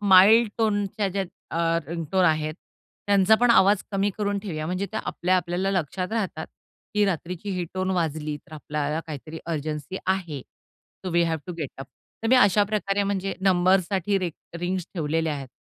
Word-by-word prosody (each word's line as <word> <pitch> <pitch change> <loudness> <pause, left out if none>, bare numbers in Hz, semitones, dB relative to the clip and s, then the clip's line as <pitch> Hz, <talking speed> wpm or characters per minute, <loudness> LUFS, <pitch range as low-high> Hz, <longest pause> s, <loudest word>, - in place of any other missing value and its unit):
Mild 205 +3 +7
टोनच्या 205 -2 0
ज्या 195 0 -1 0.3
अ, 165 0 +2
ringtone 170 +3 0
आहेत, 155 -1 +1 0.5
त्यांचा 200 +1 +5
पण 245 0 +5
आवाज 200 -2 +5
कमी 195 +1 +1
करून 205 -1 0
ठेवूया 155 -6 -4
म्हणजे 185 +3 -2
त्या 220 - -2
आपल्या 185 +1 +1
आपल्याला 180 +2 -1
लक्षात 185 +2 -2
राहतात, 190 -8 -2 0.5
की 210 0 +4
रात्रीची 180 +1 -3
ही 180 - -1
टोन 185 0 -1
वाजली, 155 -4 -1
तर 150 - -19
आपल्याला 150 +1 -2
काहीतरी 155 +1 -7
अर्जन्सी 155 +1 -3
आहे. 175 -7 -1
So 185 - -13
V 170 0 +3
have 160 -1 0
to 180 - -4
get 150 -5 -3
up. 135 - -7 0.4
तर 225 - 0
मी 260 - +6
अशाप्रकारे 205 -2 +3
म्हणजे 195 -1 -1
नंबरसाठी 190 +1 +2
रि 180 -2 -2 0.3
रिंग्स 180 0 -2
ठेवलेले 160 -1 0
आहेत. 140 -3 -4
185 Hz, 165 wpm, -25 LUFS, 160-200 Hz, 0.5 s, Mild